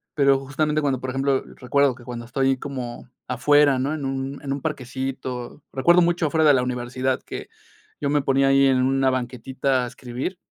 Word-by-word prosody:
Pero 140 -2 +4
justamente 150 +3 -1
cuando, 135 -3 0
por 130 0 -4
ejemplo, 135 0 +1
recuerdo 140 +1 +2
que 120 - -15
cuando 120 -1 -7
estoy 135 +2 +1
como 125 -4 -6 0.2
afuera, 140 +2 +4
¿no? 140 +4 -1
En 145 -3 -4
un 135 +1 -4
en 135 - -4
un 140 - -5
parquecito. 130 -2 -5
Recuerdo 175 +7 +4
mucho 170 0 +2
afuera 160 +1 +2
de 145 - +7
la 125 - +2
universidad 125 +1 -2
que - - -7 0.5
yo 140 - 0
me 145 -1 +2
ponía 135 0 +3
ahí 135 0 +5
en 130 -1 +3
una 135 0 +2
banquetita 130 +1 -1
a - - -3
escribir. 125 +9 -5
135 Hz, 190 wpm, -23 LUFS, 130-140 Hz, 0.5 s, de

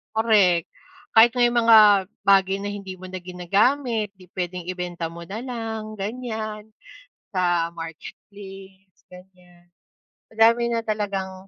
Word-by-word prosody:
Correct. 205 -7 +3 0.4
Kahit 230 +2 +6
may 240 -1 +3
mga 215 -5 +6 0.2
bagay 195 -1 +3
na 205 - -3
hindi 200 -2 -7
mo 185 - -17
na 185 - -5
ginagamit, 205 +5 0
'di 185 -2 -19
puwedeng 180 0 -4
ibenta 175 -2 -5
mo 170 0 -10
na 215 +6 -6
lang, 225 -3 -5
ganyan 220 -1 -5 0.6
sa 175 -3 0
marketplace, 190 +3 -12
ganyan. 180 -1 -18 0.6
Madami 225 +2 +3
na 230 -1 -2
talagang, 195 -3 -4
195 Hz, 120 wpm, -23 LUFS, 180-220 Hz, 0.6 s, Kahit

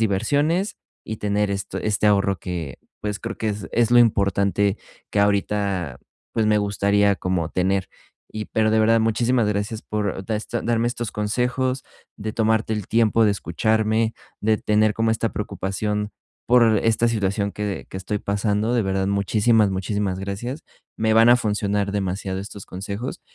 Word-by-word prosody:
diversiones 145 - +1 0.3
y 110 - -5
tener 105 0 0
esto 100 -1 -3
este 105 0 0
ahorro 100 -2 +3
que, 85 -6 -5 0.2
pues, 105 -1 -3
creo 115 0 -5
que 110 - -1
es 105 0 -5
es 120 -1 +2
lo 120 - +6
importante 100 -2 +2 0.3
que 100 - +1
ahorita, 100 -6 0 0.3
pues, 110 -1 +1
me 105 0 +4
gustaría 100 0 +2
como 90 -4 -1
tener, 95 +1 0 0.4
y 110 0 -4
pero 110 -1 +1
de 110 - +3
verdad, 115 +1 +4
muchísimas 115 +1 +2
gracias 105 +2 -2
por 100 -3 -3
da 110 -2 0
esta 115 +2 -4
darme 115 0 +1
estos 120 -1 -4
consejos, 125 +5 -1 0.3
de 110 -1 -5
tomarte 110 0 +1
el 105 -3 -4
tiempo 115 0 +3
de 105 - +4
escucharme, 110 +5 0 0.3
de 110 0 +2
tener 105 0 +2
como 115 +1 +1
esta 110 0 0
preocupación 105 +1 -3 0.3
por 115 -3 +5
esta 115 +2 +2
situación 100 -2 -1
que 105 -2 -4
que - - -6
estoy 100 +3 -3
pasando, 105 +3 0
de 120 - +2
verdad, 95 -1 0
muchísimas, 105 +2 +3
muchísimas 95 0 -2
gracias. 120 +10 -5 0.4
Me 110 0 +2
van 115 +1 +6
a 120 - +7
funcionar 105 -3 -1
demasiado 95 -1 -2
estos 100 0 -9
consejos, 100 +6 -5
105 Hz, 160 wpm, -23 LUFS, 100-115 Hz, 0.4 s, a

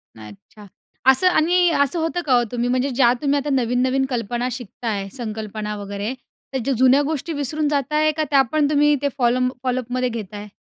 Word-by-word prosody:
नाही 110 -1 -11
अच्छा, 205 - -16 0.5
असं 265 +8 +2
आणि 355 +1 +3
असं 285 +5 -2
होतं 325 +2 -1
का 270 - +2
हो? 240 -1 +4
तुम्ही 245 0 -1
म्हणजे 255 +2 +1
ज्या 245 -2 +3
तुम्ही 285 -1 +1
आता 285 +1 -4
नवीन-नवीन 255 +1 +1
कल्पना 240 0 -2
शिकताय 225 -4 -4
संकल्पना 215 -2 -5
वगैरे 200 +3 -4 0.4
तर - - 0
जु 275 - +1
जुन्या 260 +3 +5
गोष्टी 315 +2 -3
विसरून 295 +1 -1
जात 285 0 -1
आहे, 310 0 +3
का 310 +1 -2
त्या 275 -1 +6
पण 300 -2 +2
तुम्ही 295 0 +4
ते 285 - +1
फॉलो 245 -1 +2 0.2
फॉलोअपमध्ये 255 0 -1
घेताय? 210 -2 -7
255 Hz, 185 wpm, -21 LUFS, 235-290 Hz, 0.5 s, त्या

